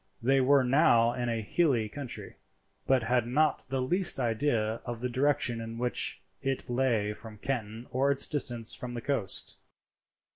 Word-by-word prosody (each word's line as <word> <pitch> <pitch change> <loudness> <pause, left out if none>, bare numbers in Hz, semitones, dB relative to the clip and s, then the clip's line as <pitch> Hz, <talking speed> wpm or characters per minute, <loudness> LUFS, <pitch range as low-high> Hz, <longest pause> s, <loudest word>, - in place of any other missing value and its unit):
They 135 +3 +3
were 135 +1 +4
now 125 -3 +4
in 120 -1 -2
a 115 -1 -2
hilly 125 -3 +1
country, 125 +1 -7 0.5
but 130 -3 +3
had 120 0 +1
not 150 +5 +1
the 130 -1 -1
least 175 +3 +2
idea 115 -2 0
of 120 -2 -5
the 125 +1 -2
direction 130 -2 +1
in 115 0 -6
which 125 +1 0 0.2
it 135 -1 -2
lay 120 -5 +1
from 110 0 -11
Canton 115 -1 -4
or 130 +3 +2
its 140 -1 +3
distance 120 -6 0
from 120 -1 -6
the 120 - -4
coast. 125 -7 -2
125 Hz, 160 wpm, -29 LUFS, 115-135 Hz, 0.5 s, were